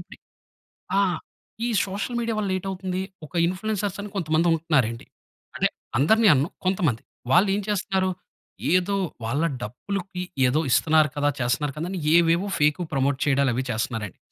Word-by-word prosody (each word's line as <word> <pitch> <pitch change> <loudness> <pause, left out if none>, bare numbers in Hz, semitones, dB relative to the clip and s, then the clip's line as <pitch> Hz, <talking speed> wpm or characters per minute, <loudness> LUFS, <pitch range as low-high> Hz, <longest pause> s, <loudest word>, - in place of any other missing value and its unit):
ఇప్పుడీ - - -13 0.8
ఆ! - - +5 0.7
ఈ - - 0 0.2
సోషల్ 205 +5 -3
మీడియా 230 -1 -1
వల్ల 200 -2 -1
ఏటవుతుంది, 185 -1 -3 0.2
ఒక 145 - -17
ఇన్‌ఫ్లుయెన్సర్స్ 200 +1 -2
అని 205 - -7
కొంతమంది 165 -2 +1
ఉంటున్నారండి. 140 -8 0 0.5
అంటే - - +2 0.3
అందరిని 220 +10 +4
అనను, 145 +4 +1 0.2
కొంతమంది. 175 - +1 0.3
వాళ్లేం 195 +5 +4
చేస్తున్నారు? 190 -2 0 0.6
ఏదో 185 +2 +2 0.3
వాళ్ళ 135 +8 0 0.2
డబ్బులకి 180 - -5 0.2
ఏదో 135 +5 +2
ఇస్తున్నారు 155 +2 +4
కదా! 145 0 +2
చేస్తున్నారు 130 +4 0
కదా! 165 - -3
అని 190 - -3 0.2
ఏవేవో 170 +3 +4
ఫేకువి 150 +3 +2
ప్రమోట్ 135 0 +1
చేయడాలు 140 -2 +3
అవి 130 +3 -1
చేస్తున్నారండి. 110 -3 -3
170 Hz, 140 wpm, -24 LUFS, 140-195 Hz, 0.8 s, ఆ